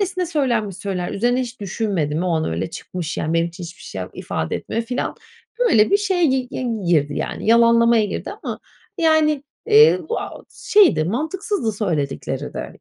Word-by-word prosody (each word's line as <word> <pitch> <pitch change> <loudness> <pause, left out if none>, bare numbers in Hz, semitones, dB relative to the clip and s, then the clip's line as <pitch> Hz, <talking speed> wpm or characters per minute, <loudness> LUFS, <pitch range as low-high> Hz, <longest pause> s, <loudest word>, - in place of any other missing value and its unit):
öylesine 370 -2 -1
söylenmiş 240 - 0
sözler, 190 -4 -3
üzerine 245 +5 +1
hiç 250 -2 -6
düşünmedim. 190 -7 -1
O 185 - 0
an 160 - 0
öyle 80 - -3
çıkmış, 175 0 -5
yani, 160 - -1
benim 165 0 +2
için 175 +2 -11
hiçbir 170 +2 -11
şey 95 - -7
yap 90 - -6
ifade 80 - -3
etmiyor.” 230 - -3
filan. 245 +2 -3 0.4
Böyle 225 - +4
bir 400 - +6
şeye 385 -4 +1
gi 260 -4 +1
gi 255 - -4 0.2
girdi, 150 -4 +2
yani, - - -4
yalanlamaya 230 0 +5
girdi 205 - -4
ama - - -4 0.4
yani, 315 -3 +3 0.2
eee, 450 +1 +6
bu, 470 - -1
aaa, - - -7
şeydi, 380 - +4
mantıksızdı 310 - -2
söyledikleri 165 -10 -3
de. - - -5
230 Hz, 175 wpm, -21 LUFS, -, 0.4 s, bir